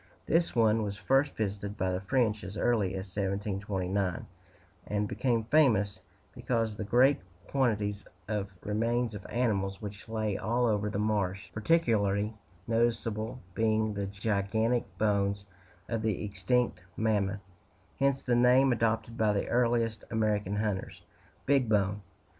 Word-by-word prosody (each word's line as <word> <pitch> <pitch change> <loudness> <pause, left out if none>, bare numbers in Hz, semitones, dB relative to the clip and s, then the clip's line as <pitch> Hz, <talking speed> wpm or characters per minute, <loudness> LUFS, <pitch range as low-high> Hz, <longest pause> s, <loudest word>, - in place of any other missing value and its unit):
This 165 -2 +1
one 110 -1 +4
was 100 -1 -3
first 135 +6 +2
visited 100 -1 -3
by 95 -1 0
the 90 +1 -2
French 110 0 +1
as 100 +3 -7
early 105 -6 +1
as 95 0 -4
1729, 100 -2 -2 0.6
and 105 0 0
became 120 0 0
famous 110 -8 +3 0.3
because 115 -3 -1
of 105 - -10
the - - -1
great 125 +5 +4 0.3
quantities 105 -6 0 0.2
of 105 -2 -2
remains 115 +2 0
of 100 -2 -7
animals 100 -6 0
which 105 -1 -8
lay 110 -3 -1
all 120 +4 +1
over 105 -2 +1
the 105 - -3
marsh, 100 -2 -1
particularly 110 -6 +2 0.3
noticeable 115 0 0
being 110 0 +1
the 100 -1 -3
gigantic 105 +3 0
bones 100 -1 +1 0.4
of 115 -1 -2
the 110 -2 -1
extinct 100 +1 0 0.2
mammoth 105 -2 0 0.6
hence 140 -1 +2
the 125 - +1
name 125 +2 +5
adopted 115 0 0
by 110 -1 +3
the 100 - -1
earliest 115 -2 +1
American 105 -3 0
hunters, 105 -2 -3 0.4
"Big 135 -4 +3
Bone." 100 -1 +1
110 Hz, 135 wpm, -30 LUFS, 100-115 Hz, 0.6 s, name